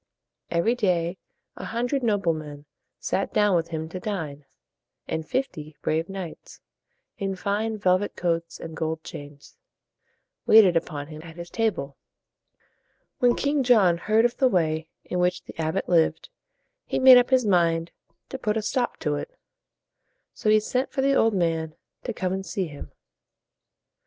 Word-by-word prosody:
Every 170 +8 +2
day 180 -6 0 0.4
a - - -6
hundred 245 +4 -1
noble 205 -7 +1
men 150 -2 -8 0.3
sat 195 - -1
down 210 -3 +3
with 165 -1 +1
him 160 -1 -4
to 185 - -6
dine; 160 -8 -5 0.6
and 160 -1 -3
fifty 155 - -3
brave 160 +3 0
knights, 190 -4 -8 0.6
in 195 -2 -2
fine 210 +3 -2
velvet 185 0 +1
coats 170 -1 -2
and 160 -1 -8
gold 160 0 -3
chains, 145 - -11 0.9
waited 205 -5 +7
upon 155 -3 -2
him 155 +1 -10
at 165 0 -11
his 170 0 -9
table. 180 -12 -1 1.2
When 245 -1 +4
King 285 0 +1
John 210 -9 +4
heard 220 +5 +3
of 240 - 0
the 265 - +4
way 160 -5 0 0.2
in 180 - -3
which 180 0 +1
the - - -12
abbot 160 +4 -1
lived, 170 - +2 0.6
he - - -1
made 260 -1 +9
up 245 - +1
his 260 -3 +3
mind 170 -4 +2 0.4
to 265 - -6
put 210 0 0
a 220 - -2
stop 245 +3 -1
to 150 -2 0
it. - - -8 1.0
So 215 - -1
he 215 0 +6
sent 250 +5 -2
for 270 - -1
the 275 +1 +3
old 225 -5 +3
man 165 -3 -1 0.3
to 245 - -2
come 185 -4 -2
and 190 0 -3
see 190 0 -2
him. 145 -3 -10
180 Hz, 160 wpm, -25 LUFS, 160-220 Hz, 1.2 s, made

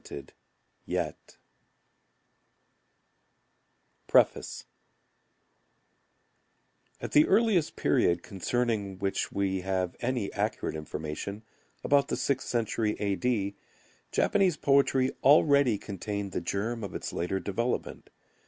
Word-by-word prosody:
Endleaf - - -1 2.9
Preface - - +2 2.3
At - - -6
the 300 - +5
earliest 205 -5 +3
period 85 0 +2
concerning 100 0 -2
which 100 0 -2
we 95 -1 -1
have 95 -1 -1
any 120 -4 -2
accurate 105 -5 -2
information, 80 +7 -5 0.4
about 140 -1 +3
the - - -2
sixth 135 -1 -1
century 110 -2 0
A. 100 -1 0
D., 100 -1 -1 0.6
Japanese 185 -5 +2
poetry 135 -2 +3
already 140 -4 +5
contained 100 0 -5
the - - -2
germ 110 +6 -2
of 100 - -6
its - - -5
later 90 +3 -1
development. 115 +6 -3
105 Hz, 95 wpm, -29 LUFS, 95-130 Hz, 2.9 s, the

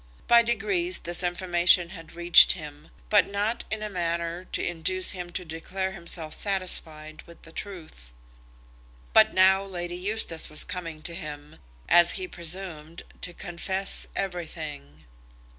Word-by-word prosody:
By 235 0 +6
degrees 195 -6 0
this 175 +1 -3
information 175 -1 +2
had 165 -3 -11
reached 175 0 +8
him, 150 -4 -10 0.2
but 210 -1 +5
not 205 +4 -2
in 215 0 -3
a - - -2
manner 170 0 -3
to - - -3
induce 175 +2 +1
him 180 -2 -6
to 180 - -3
declare 185 +4 -4
himself 170 -3 -4
satisfied 160 -6 0
with 170 - -16
the 165 - -13
truth. 160 - -9 1.0
But - - +5
now 190 +1 +5
Lady 175 -3 -6
Eustace 185 -3 -3
was 155 - +1
coming 165 -4 -7
to 170 - -3
him, 150 -2 -8 0.3
as 175 0 +6
he 375 - -3
presumed, 170 - -6 0.2
to 180 - -5
confess 190 +3 -4
everything. 155 - -6
175 Hz, 140 wpm, -26 LUFS, 165-190 Hz, 1.0 s, reached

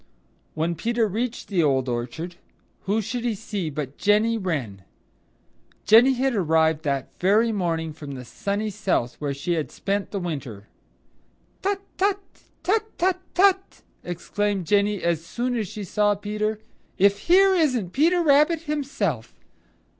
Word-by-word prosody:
When 160 +2 0
Peter 230 +5 0
reached 230 +4 -3
the 190 -4 +1
Old 135 -4 +2
Orchard, 125 +9 -4 0.5
who 215 +3 +1
should 235 +3 -4
he 235 -3 0
see 200 -5 -4
but 145 -2 -6
Jenny 215 +3 +3
Wren. 145 - -3 1.0
Jenny 235 +5 +7
had 260 +1 0
arrived 160 -5 +2
that 140 -2 -1
very 215 +5 +3
morning 165 -6 -2
from 145 -2 -8
the 125 -1 -8
Sunny 205 - -3
South 190 - -1
where 140 -2 -2
she 160 +5 -2
had 160 -3 -2
spent 200 0 -2
the 200 - -3
winter. 140 - -5 1.0
"Tut, 395 0 -1 0.2
tut, 395 +1 +2 0.5
tut, 435 +3 +1
tut, 370 +1 +1 0.2
tut!" 385 0 +2 0.2
exclaimed 195 +2 -2
Jenny 205 +1 +1
as 170 -2 0
soon 245 +7 -2
as 220 -4 -1
she 210 +3 -7
saw 205 +2 +1
Peter. 210 +1 -2 0.4
"If 200 +1 +4
here 385 +2 +6
isn't 255 - +1
Peter 340 +5 +3
Rabbit 300 +2 +4
himself! 275 - -3
205 Hz, 145 wpm, -24 LUFS, 160-245 Hz, 1.0 s, Jenny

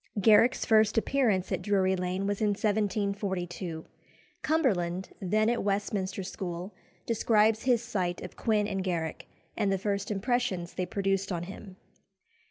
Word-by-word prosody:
Garrick's 220 +5 +5
first 220 -2 +4
appearance 225 -7 +1
at 185 -2 -1
Drury 190 -1 +2
Lane 180 +1 -2
was 205 +1 -2
in 215 - +3
1742. 200 -5 -1 0.6
Cumberland, 190 - 0
then 215 +3 +2
at 240 +1 +1
Westminster 200 -1 -1
School, 180 +1 -5 0.3
describes 220 -1 +3
his 245 -3 +3
sight 185 -6 -2
of 180 - -8
Quin 210 -2 +1
and 195 -2 -2
Garrick, 170 -4 -3 0.3
and 205 -3 +1
the 195 - +2
first 200 +1 -2
impressions 210 -4 -1
they 180 -1 -2
produced 195 +1 -1
on 175 -1 -2
him. 190 +1 -9
200 Hz, 140 wpm, -29 LUFS, 185-215 Hz, 0.6 s, Garrick's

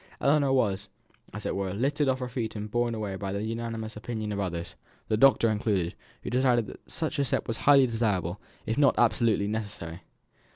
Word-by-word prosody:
Ellinor 140 -1 +3
was, 100 -6 +1 0.4
as - - -7
it - - -1
were, 95 -1 -2
lifted 140 +5 +1
off 130 - +2
her 125 - -2
feet 115 -3 -4
and 105 0 -5
borne 120 0 +1
away 105 -3 -3
by 95 0 -4
the 100 +1 -2
unanimous 115 -1 -4
opinion 110 -1 -4
of 100 - -2
others 85 -3 -3 0.4
the 110 - +3
doctor 130 0 +5
included 105 -5 0 0.3
who - - -4
decided 125 -2 +3
that - - -12
such 160 -2 -2
a - - +3
step 135 - -1
was 115 - -2
highly 140 -2 +8
desirable; 105 -6 -1 0.2
if 110 +5 -1
not 140 -3 +5
absolutely 110 -3 +3
necessary. 100 -6 -5
110 Hz, 195 wpm, -28 LUFS, 100-125 Hz, 0.4 s, highly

